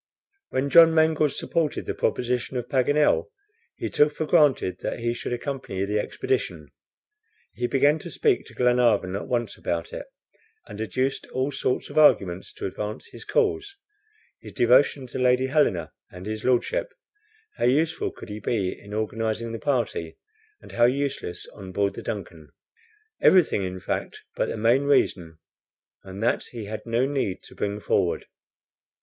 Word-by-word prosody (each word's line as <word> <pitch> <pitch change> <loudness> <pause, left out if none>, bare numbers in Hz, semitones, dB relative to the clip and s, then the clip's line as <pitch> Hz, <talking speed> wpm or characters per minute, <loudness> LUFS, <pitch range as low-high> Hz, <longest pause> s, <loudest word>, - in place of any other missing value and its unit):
When 135 +2 -1
John 165 -1 +8
Mangles 160 -2 +3
supported 160 -4 -1
the - - -2
proposition 125 +1 -1
of 125 -1 -4
Paganel, 145 - +2 0.5
he - - -4
took 150 0 +2
for 155 - -2
granted 150 - +3
that - - -3
he 120 0 -1
should 120 - -5
accompany 120 -6 -3
the 105 +1 0
expedition. 395 - -2 0.8
He 120 - -2
began 145 +4 +3
to - - -8
speak 425 -5 +1
to - - -15
Glenarvan 120 -6 +2
at 100 - -4
once 120 -4 -2
about 85 -1 -3
it, - - -6 0.6
and 105 - -8
adduced 130 +6 -1
all 130 +2 -2
sorts 130 0 -2
of 155 - +2
arguments 95 -11 +4
to - - -6
advance 105 +3 -5
his - - -11
cause 405 -3 0 0.6
his - - -11
devotion 130 +3 +4
to 125 - -6
Lady 125 0 +3
Helena 130 - +1 0.2
and 90 +1 -10
his 110 0 -4
Lordship, 470 - +1 0.7
how - - 0
useful 155 +6 +2
could - - -12
he 105 +1 -6
be 100 -3 -1
in 100 +1 -9
organizing 110 +1 -2
the 115 - -5
party, 120 - -1 0.4
and - - -14
how 120 - +4
useless 130 -8 -1
on 95 -2 -9
board 100 +1 0
the - - -7
DUNCAN; 85 -7 -6 0.7
everything, 180 - +5
in 95 0 -4
fact, - - -4
but - - 0
the - - -3
main 120 +6 +3
reason, 85 - +1 0.7
and 95 +2 -7
that 120 - +1
he 115 -3 -8
had 110 +3 -7
no 115 +3 +2
need 135 -9 -2
to - - -14
bring 100 0 -3
forward. - - 0
120 Hz, 160 wpm, -25 LUFS, 105-145 Hz, 0.8 s, John